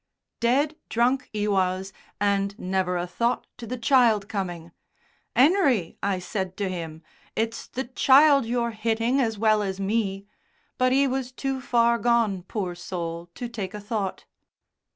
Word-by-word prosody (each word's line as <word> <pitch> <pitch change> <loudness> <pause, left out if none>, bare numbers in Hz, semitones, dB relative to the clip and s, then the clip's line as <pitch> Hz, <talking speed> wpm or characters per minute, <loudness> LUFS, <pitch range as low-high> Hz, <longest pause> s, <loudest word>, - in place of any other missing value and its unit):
"Dead 275 +6 +2
drunk, 245 +3 +1
'e 210 0 0
was, 190 -1 0 0.3
and 200 0 0
never 185 -1 -1
a 175 - -1
thought 235 +7 -1
to 235 -1 -9
the 255 - -4
child 230 -4 +3
coming, 175 -5 -4 0.6
''Enery,' 270 - +3
I 200 -1 0
said 185 0 -4
to 200 - -1
him, 165 -3 -6 0.3
'it's 225 +1 -2
the 260 - -4
child 275 +1 +5
you're 235 0 0
hitting 230 +4 0
as 225 -4 0
well 215 0 +3
as 195 -1 -3
me'; 195 -1 -1 0.5
but 255 0 +3
'e 275 +2 +4
was 260 -1 -2
too 265 0 -3
far 235 -2 +2
gone, 230 -5 +2
poor 185 -1 -4
soul, 170 -1 -5
to 245 - -4
take 210 -4 -5
a - - -5
thought." 205 -2 -3
220 Hz, 150 wpm, -25 LUFS, 190-245 Hz, 0.6 s, child